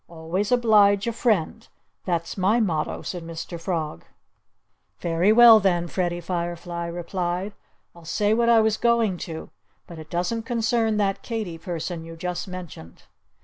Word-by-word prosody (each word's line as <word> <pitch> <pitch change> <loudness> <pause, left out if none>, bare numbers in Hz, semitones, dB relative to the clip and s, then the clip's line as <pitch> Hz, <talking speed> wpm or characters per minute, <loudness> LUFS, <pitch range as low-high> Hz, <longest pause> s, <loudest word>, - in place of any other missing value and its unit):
Always 170 +6 -3
oblige 210 -5 +4
a 235 - -1
friend! 215 -9 0 0.4
That's 170 -2 -2
my 200 +5 +2
motto!" 165 -9 -1
said 180 - -5
Mr. 165 +1 -7
Frog. 160 - -3 1.0
"Very 170 +4 +2
well, 230 -1 +9
then!" 175 -4 +1
Freddie 175 0 -2
Firefly 170 0 -4
replied. 175 +3 -3 0.4
"I'll 170 - -15
say 205 +5 +1
what 235 +1 +2
I 230 -1 +6
was 220 0 +1
going 235 -5 +2
to; 160 -1 -7 0.3
but 170 -2 -11
it 155 0 -11
doesn't 180 +7 -1
concern 225 -2 +1
that 200 -2 0
Katy 215 -8 -5
person 170 0 -5
you 165 0 -9
just 175 +2 -4
mentioned." 175 - -10
180 Hz, 145 wpm, -24 LUFS, 170-215 Hz, 1.0 s, well